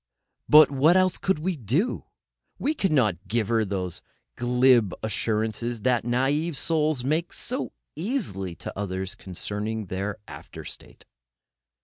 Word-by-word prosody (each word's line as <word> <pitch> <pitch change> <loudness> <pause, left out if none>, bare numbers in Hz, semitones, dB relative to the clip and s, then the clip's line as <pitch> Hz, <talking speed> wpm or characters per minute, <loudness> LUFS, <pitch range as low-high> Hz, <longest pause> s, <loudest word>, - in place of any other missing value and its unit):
But 150 -1 +8
what 150 +6 +5
else 185 -1 +2
could 190 -4 +1
we 175 +4 -1
do? 145 - -1 0.5
We 300 - 0
could 195 - 0
not 105 - +1
give 110 0 0
her 115 -1 +3
those 95 -3 -3 0.3
glib 125 -4 +3
assurances 110 +1 -1
that 125 -1 +2
naive 135 +6 0
souls 155 -5 0
make 155 +6 0
so - - -4 0.2
easily 150 - -2
to - - -7
others 95 -1 -3
concerning 105 +3 -4
their 95 +2 -3
after - - -10
state. - - -10
120 Hz, 130 wpm, -26 LUFS, 105-155 Hz, 0.5 s, But